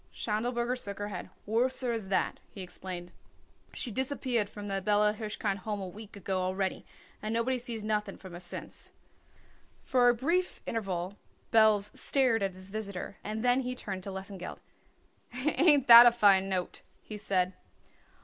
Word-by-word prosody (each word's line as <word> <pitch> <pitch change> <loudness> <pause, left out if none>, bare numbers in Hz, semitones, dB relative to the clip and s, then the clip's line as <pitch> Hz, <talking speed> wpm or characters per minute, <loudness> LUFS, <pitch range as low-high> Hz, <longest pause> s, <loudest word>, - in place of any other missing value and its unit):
Schindelberger 240 +3 -1
shook 200 -1 -5
his 205 0 -4
head. 185 -4 -6 0.2
"Worser 245 +3 +1
as 225 -4 -2
that," 190 - 0
he 195 - -8
explained. 180 -1 -7 0.6
"She 240 - -4
disappeared 255 -3 -1
from 205 0 -8
the 195 -1 -2
Bella 210 +1 +3
Hirshkind 210 -2 -3
Home 210 +1 -4
a 190 - -5
week 210 +3 -11
ago 190 -1 -2
already 190 +1 -2 0.3
and 215 - -3
nobody 240 +3 0
sees 235 -3 -3
nothing 210 -1 -2
from 185 -2 -11
her 175 - -7
since." 175 -1 -5 0.9
For 245 -2 +4
a 240 - +3
brief 335 +9 0
interval 195 -3 -3 0.3
Belz 215 -2 +4
stared 255 -5 +2
at 195 -1 -1
his 185 +1 -7
visitor 200 -3 -5
and 215 +3 -3
then 245 +1 +4
he 250 -1 -3
turned 190 -6 -5
to 195 - -7
Lesengeld. 190 -1 -7 0.8
"Ain't 290 +1 +4
that 235 0 +12
a - - +7
fine 200 -4 +4
note?" 185 -2 -3 0.2
he 215 - -8
said. 190 -3 0
210 Hz, 160 wpm, -30 LUFS, 195-240 Hz, 0.9 s, that